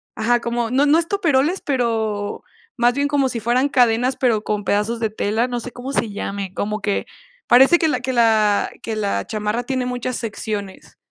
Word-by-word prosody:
ajá, 240 +2 +2
como, 235 -1 -2
no 265 +4 +2
no 300 +3 +4
estoperoles, 335 -2 +1
pero 220 -6 -2 0.3
más 240 0 +3
bien 285 +2 0
como 285 -2 +1
si 240 - -3
fueran 245 +5 +1
cadenas, 250 0 +2
pero 230 -5 +1
con 210 -1 -2
pedazos 210 +4 0
de 225 -1 0
tela, 220 +2 -1
no 245 -1 -3
sé 245 +1 -8
cómo 255 +3 -7
se 230 -5 -1
llame, 200 -1 -5
como 210 +2 -3
que 200 0 -1 0.4
parece 265 +8 +6
que 320 - +2
la 275 -5 0
que 260 +1 -2
la 220 -3 +3
que 225 - -3
la 205 -2 -1
chamarra 215 +2 -2
tiene 255 0 -2
muchas 250 0 -3
secciones. 210 -3 -6
235 Hz, 190 wpm, -20 LUFS, 215-260 Hz, 0.4 s, parece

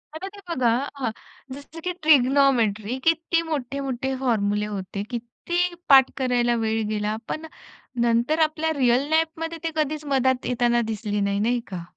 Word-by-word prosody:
आता 360 +5 -5
ते - - -11
बघा 255 -8 +1 0.3
हं, 255 -5 -1 0.4
जसं 285 +3 -11
की - - +1
ट्रिग्नोमेट्री 255 -6 +3
किती 330 +1 +2
मोठे-मोठे 265 -2 -3
फॉर्मुले 210 -5 0
होते, 200 -1 -5
किती 240 +8 -4 0.3
पाठ 265 -2 +8
करायला 245 -2 +1
वेळ 220 0 0
गेला, 210 0 -1
पण 315 - -4 0.6
नंतर 235 +7 +2
आपल्या 320 +1 -2
रिअल 255 +1 +3
लाईफ 320 +1 +3 0.2
मध्ये 330 0 -4
ते 330 - -1
कधीच 305 0 -1
मदत 260 -1 +1
येताना 240 -1 +2
दिसली 210 -1 -2
नाही, 200 0 0
नाही 240 +4 +1
का? 180 -2 -5
250 Hz, 150 wpm, -24 LUFS, 225-295 Hz, 0.6 s, पाठ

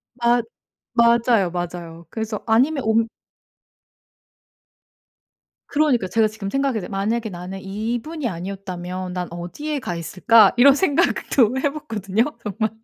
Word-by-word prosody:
맞 240 0 +2 0.5
맞아요. 235 -4 +4
맞아요. 170 -1 -6
그래서 220 0 -4
아니면 260 +5 +2
옮 225 +1 +2 2.6
그러니까 285 -9 +2
제가 220 +4 +2
지금 215 -2 -6
생각했는데 270 -5 -1
만약에 220 +4 -1
나는 180 +1 -7
이분이 235 +9 -3
아니었다면 185 -1 -5
난 180 -1 -3
어디에 180 - -4
가 180 -10 -4
있을까 190 +6 +4
이런 275 +3 +8
생각도 275 - +2
해 285 - +1
봤거든요 220 -7 -1 0.2
정말. 215 +1 -1
220 Hz, 280 characters per minute, -22 LUFS, 185-240 Hz, 2.6 s, 이런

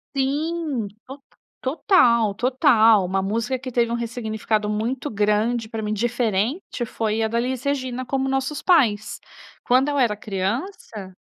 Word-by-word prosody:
Sim, 285 -3 -1 0.2
to 275 +1 -10 0.4
total, 245 - +3
total, 230 - +4
uma 190 +1 -1
música 225 +6 -1
que 255 0 -7
teve 235 -1 +1
um 235 - 0
ressignificado 220 -2 -2
muito 230 +5 -2
grande 215 +2 0
para 225 -1 -4
mim 210 0 -2
diferente 240 - -1
foi 220 0 -2
a - - +2
da 235 - -1
Elis 255 +1 -2
Regina, 255 -3 -2
Como 270 +1 -1
Nossos 270 +2 -2
Pais, 235 - +2 0.4
quando 255 +3 +3
eu 290 - -1
era 230 -6 +2
criança, 210 - -4
235 Hz, 145 wpm, -22 LUFS, 215-265 Hz, 0.4 s, total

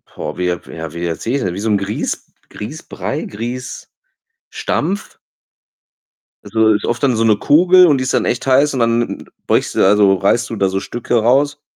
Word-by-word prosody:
Boah, - - -6
wie 90 - -1
ja 90 0 -1
ja, 80 -1 -7
wie 85 +1 -4
erzähl 85 +8 -3
ich - - +2
es - - -3
denn? 90 - -2
Wie 95 - -6
so 110 +2 -2
'n 105 - +3
Grieß 100 +2 -4 0.2
Grießbrei, - - -6
Grießstampf. 125 - -8 2.3
Also, 110 -1 +2
ist 105 - -2
oft 120 +3 -2
dann 130 -5 +2
so 115 - +1
'ne 110 -2 +4
Kugel 180 - +5
und 150 -5 +4
die 130 - -2
ist 130 - -2
dann - - +2
echt 120 - -2
heiß 140 +3 +3
und 130 - -2
dann 115 0 0 0.2
beugst - - 0
du - - -1
da 100 +2 +5
so 100 -2 +5
reißt 105 +5 +1
du 115 - -4
da 100 -2 +1
so 95 - -1
Stücke 120 +4 -3
raus 145 +5 +2
115 Hz, 205 wpm, -17 LUFS, 100-130 Hz, 2.3 s, Kugel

